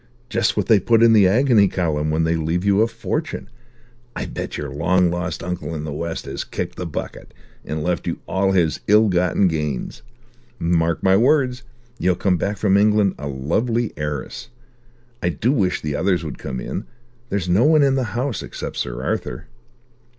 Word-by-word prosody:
Just - - 0
what - - +1
they 110 -3 +5
put 115 +4 +3
in 115 -1 +6
the 105 -4 +6
agony 110 0 +4
column 75 -5 -1
when 80 +1 +1
they 80 +1 +1
leave 80 +3 -1
you 100 +1 +4
a 115 - +4
fortune. 115 +7 -4 0.6
I - - -3
bet - - -5
your 70 -2 -5
long 85 +4 +2
lost 90 -2 -3
uncle 90 -1 -4
in 75 - -4
the 75 -2 -4
West 85 +2 -4
has - - -4
kicked - - -5
the 90 - -5
bucket, 80 - -7 0.3
and 75 +1 -4
left 90 0 -1
you - - -2
all 95 0 +1
his 85 -5 +1
ill 105 +1 +5
gotten 90 +1 +2
gains. 75 -6 -3 0.6
Mark 85 -2 0
my 95 0 +5
words. 130 +2 +2 0.4
You'll 90 0 +2
come 90 +1 +1
back 100 +4 -2
from 100 -2 +3
England 105 -1 +3
a 75 - -5
lovely 105 - -1
heiress. 75 -2 -5 0.7
I 90 - +1
do 95 - 0
wish 95 -10 +1
the 75 -2 -2
others 90 -1 +1
would 75 -4 -6
come 65 -1 -5
in. - - -5 0.4
There's 100 -3 -2
no 95 +7 +3
one 155 -1 +5
in 135 -1 +3
the 130 -2 0
house, 130 -1 -1
except - - -7
Sir - - -3
Arthur." - - -3
90 Hz, 185 wpm, -21 LUFS, 80-110 Hz, 0.7 s, in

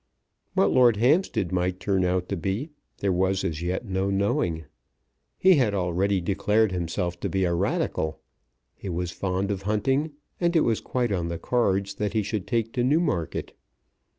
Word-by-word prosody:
What - - +3
Lord 120 -4 +5
Hampstead 125 - +2
might 90 0 0
turn 95 -2 +1
out 90 0 0
to 100 - -1
be, 100 - -3 0.3
there 100 - 0
was 95 +1 +1
as 85 -4 -2
yet 90 +6 -2
no 95 -1 -1
knowing. 95 -5 0 0.7
He 185 -3 +5
had 110 -7 +2
already 95 +2 +1
declared 105 +4 +1
himself 85 0 -2
to - - -2
be 95 -1 0
a 85 -1 +1
Radical. 80 -2 -1 0.5
He 100 - -8
was 90 0 -2
fond 95 +2 -2
of 95 -2 -3
hunting, 130 +9 0 0.3
and 170 -1 +1
it 160 - +5
was 115 -6 +1
quite 125 -3 -1
on 90 -4 -1
the 85 0 -3
cards 100 -3 0
that 105 0 -3
he 110 -2 +1
should 105 -1 -3
take 115 -2 -1
to 120 - 0
Newmarket. 135 - 0
100 Hz, 175 wpm, -26 LUFS, 90-115 Hz, 0.7 s, Lord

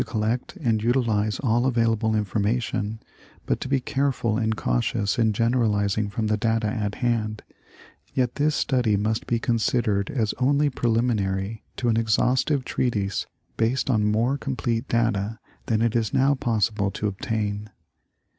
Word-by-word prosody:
41 - - -14
collect 115 +3 -2
and 115 -7 0
utilize 110 -3 +1
all 120 0 +2
available 115 -3 +1
information, 105 +1 -1 0.5
but - - 0
to - - -3
be 135 0 +2
careful 130 -4 0
and 110 -1 0
cautious 100 - 0
in 110 -1 +3
generalizing 105 -3 +1
from 110 +2 -2
the 105 0 +1
data 115 0 0
at 105 -1 -2
hand, 110 -2 -1 0.7
yet 125 -2 +1
this 150 +2 +1
study 120 -6 +1
must 110 +3 -1
be 120 - +1
considered 115 -3 0
as 110 -6 0
only 140 +3 +3
preliminary 110 -4 0 0.2
to 120 - -1
an 115 -1 +2
exhaustive 125 +5 +2
treatise 105 -6 -1 0.3
■ - - -40
based 125 +4 +1
on 110 -3 +2
more 115 +6 +1
complete 120 -3 -2
data 115 -2 0 0.3
than 110 -1 +1
it 115 0 +1
is 110 -3 0
now 135 +2 +4
possible 110 -6 0
to 105 - -4
obtain. 105 +1 -2
115 Hz, 150 wpm, -24 LUFS, 105-120 Hz, 0.7 s, now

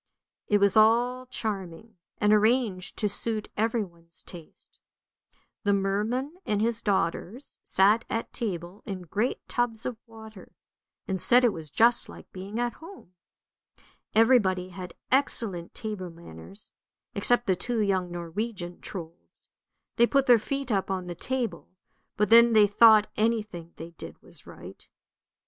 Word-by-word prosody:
It 210 - +3
was 200 0 +3
all 240 +4 +3
charming, 205 -3 -5 0.2
and 210 0 +3
arranged 215 -4 +1
to 210 - +1
suit 215 +1 -3
everyone's 185 -7 -3
taste. 170 -3 -14 0.8
The 205 -2 +2
merman 215 - -1
and 210 -1 -1
his 230 +1 0
daughters 200 +5 -2
sat 205 +4 +3
at 225 - -3
table 180 -3 -5
in 190 -3 -5
great 205 +9 -2
tubs 240 -2 -2
of 245 -3 -3
water, 220 -3 -13 0.5
and 190 -3 -2
said 245 +1 +5
it 235 -4 +3
was 160 -2 -8
just 230 - +3
like - - -13
being 195 +4 -7
at 240 0 -1
home. 330 - -14 1.0
Everybody 205 -6 +3
had 180 -1 -9 0.2
excellent 225 -10 0
table 210 -5 -5
manners, 170 - -12 0.4
except 245 0 +2
the 190 - +2
two 235 +6 -2
young 190 -4 0
Norwegian 175 +1 -5
Trolds; 170 -2 -10 0.5
they 235 - +5
put 275 +1 +2
their 245 -3 +6
feet 275 +3 -3
up 195 -2 0
on 190 -1 -2
the 175 - -5
table, 250 +6 -3 0.5
but 210 - +1
then 235 +1 +7
they 215 -1 +7
thought 215 +1 +6
any 225 0 +2
thing 170 -5 -11
they 165 +1 -9
did 170 - -11
was - - -11
right. - - -12
210 Hz, 145 wpm, -27 LUFS, 185-230 Hz, 1.0 s, then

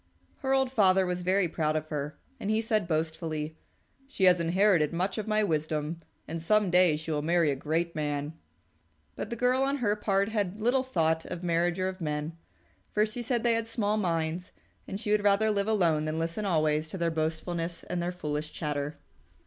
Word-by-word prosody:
Her 265 - -2
old 265 -1 +2
father 190 -5 +4
was 180 0 -2
very 185 +1 +2
proud 155 -2 -1
of 155 0 -2
her, 150 -1 -4 0.2
and 205 - -3
he 215 +1 +2
said 215 -4 0
boastfully, 160 -1 -2 0.5
"She 270 -8 -4
has 180 -1 +6
inherited 170 -2 +3
much 185 +6 -1
of 215 - -4
my 215 0 +2
wisdom, 155 -2 -1 0.3
and 165 +1 -4
some 210 +2 +2
day 180 -3 +5
she 155 +1 -5
will 150 -1 0
marry 165 -1 +2
a - - -1
great 165 +5 -1
man." 145 0 -2 0.8
But - - -5
the 235 - -3
girl 250 +2 +2
on 275 +1 +1
her 210 -5 +1
part 200 -1 +1
had 205 -2 -2
little 245 +4 +2
thought 160 -10 +1
of 180 0 -6
marriage 175 +1 +1
or 185 - +1
of 190 0 -5
men, 150 +1 -3 0.6
for 210 0 +3
she 220 +3 -5
said 240 -1 -1
they 235 -1 +4
had 230 0 -1
small 215 -2 0
minds, 170 -2 -1 0.4
and 195 - -4
she 215 -1 -2
would 210 -1 +3
rather 205 +2 +4
live 200 0 0
alone 170 -8 +2
than 155 +1 -2
listen 165 +6 -2
always 155 -2 +1
to 190 - -5
their 170 -1 0
boastfulness 165 +2 -2
and 180 -1 -3
their 175 +1 -1
foolish 150 -3 -4
chatter. 150 -1 -3
175 Hz, 200 wpm, -29 LUFS, 160-210 Hz, 0.8 s, has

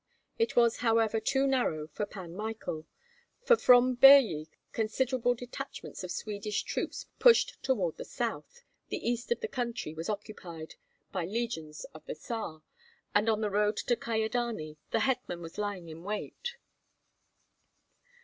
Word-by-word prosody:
It 455 0 +1
was, 235 -1 +4
however, 225 -2 +2
too 270 +5 +1
narrow 245 - +1
for 180 +7 -4
Pan 185 -5 -8
Michael; 205 -6 -5 0.6
for 485 -1 +6
from 250 - +6
Birji 245 - +8 0.2
considerable 245 +2 +1
detachments 245 -2 -7
of 180 - -5
Swedish 210 +1 -3
troops - - -3
pushed - - +5
toward 195 -11 0
the - - -5
south, 485 0 -4 0.2
the - - -3
east 240 - -1
of 475 - +1
the 450 - -1
country 235 - -3
was 165 +4 -5
occupied 185 -6 -6 0.4
by 180 -4 -2
the - - -9
legions 165 -10 -3
of 155 - -12
the - - -4
Tsar, 160 -4 -5 0.5
and 210 +2 +3
on 220 -1 +2
the 210 -1 0
road 210 +1 +2
to 240 - +1
Kyedani 220 -8 -2
the 225 - +1
hetman 245 -9 0
was 165 +3 -8
lying 200 -4 -3
in 160 0 -9
wait. 210 - -4
220 Hz, 150 wpm, -31 LUFS, 175-245 Hz, 0.6 s, Birji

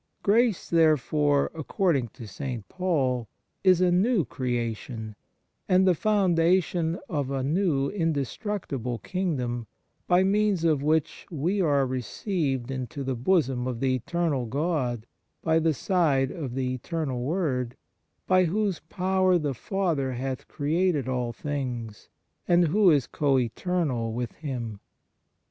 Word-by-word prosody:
Grace 220 -1 +2
therefore, 150 -3 +3
according 160 -3 0
to 115 +1 -11
St. 115 0 -5
Paul, 135 - 0 0.4
is 185 -2 +5
a 180 -1 +4
new 190 - +3
creation, 115 -3 -3 0.5
and 185 +1 +5
the 185 - +6
foundation 175 -3 +2
of 145 -5 -2
a 135 -1 -1
new 150 -2 +1
indestructible 160 - -2
kingdom, 125 - -2 0.4
by 180 +1 +4
means 200 -2 +2
of 155 -4 +2
which 155 +1 0
we 175 +5 0
are 145 -5 +3
received 130 - -2
into 130 +1 -4
the 130 0 -1
bosom 130 -2 +1
of 125 -3 -3
the 130 0 +1
Eternal 140 0 -1
God 130 -4 -1 0.4
by 160 0 +3
the 165 0 +2
side 150 -5 +1
of 140 -8 -5
the 130 -1 -1
Eternal 130 -1 -3
Word, 130 -5 -1 0.5
by 185 0 +4
whose 195 0 0
power 185 +2 +1
the 150 -4 -1
Father 155 - -1
hath 130 +1 -4
created 155 -1 0
all 125 -2 -1
things 120 -5 -5 0.4
and 175 -2 +4
who 200 +3 +5
is 145 -6 +4
co 140 0 +1
eternal 130 -1 -1
with 120 +1 -3
Him. 120 -8 -5
150 Hz, 130 wpm, -26 LUFS, 125-180 Hz, 0.5 s, the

